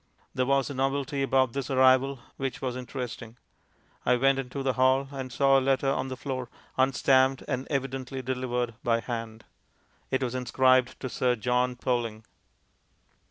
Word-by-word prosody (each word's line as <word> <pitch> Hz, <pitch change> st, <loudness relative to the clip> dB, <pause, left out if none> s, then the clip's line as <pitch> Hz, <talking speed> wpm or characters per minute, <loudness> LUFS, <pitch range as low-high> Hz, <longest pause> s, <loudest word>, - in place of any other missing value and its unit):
There 130 Hz, 0 st, 0 dB
was 140 Hz, -1 st, +2 dB
a 140 Hz, -, -5 dB
novelty 135 Hz, +1 st, -1 dB
about 130 Hz, -3 st, +2 dB
this 135 Hz, -1 st, -3 dB
arrival 130 Hz, +1 st, +4 dB, 0.2 s
which 135 Hz, -1 st, -3 dB
was 130 Hz, -2 st, -3 dB
interesting. 125 Hz, -2 st, -6 dB, 0.7 s
I 125 Hz, -, +3 dB
went 135 Hz, +2 st, +3 dB
into 135 Hz, +1 st, -4 dB
the 135 Hz, -1 st, +1 dB
hall, 130 Hz, +2 st, +3 dB
and 135 Hz, -2 st, -6 dB
saw 135 Hz, +2 st, +4 dB
a -, -, -3 dB
letter 135 Hz, +1 st, +2 dB
on 135 Hz, -, -1 dB
the 130 Hz, -1 st, -6 dB
floor, 130 Hz, -2 st, -4 dB, 0.3 s
unstamped 130 Hz, 0 st, +3 dB
and 130 Hz, +1 st, -2 dB
evidently 135 Hz, -1 st, -3 dB
delivered 125 Hz, -2 st, -2 dB
by 115 Hz, -1 st, +2 dB
hand. 115 Hz, -2 st, -5 dB, 0.7 s
It 130 Hz, 0 st, 0 dB
was 125 Hz, -1 st, -2 dB
inscribed 130 Hz, 0 st, +2 dB
to 130 Hz, -, -3 dB
Sir 125 Hz, 0 st, +1 dB
John 125 Hz, +2 st, 0 dB
Poling. 120 Hz, -3 st, -2 dB
130 Hz, 160 wpm, -27 LUFS, 125-135 Hz, 0.7 s, arrival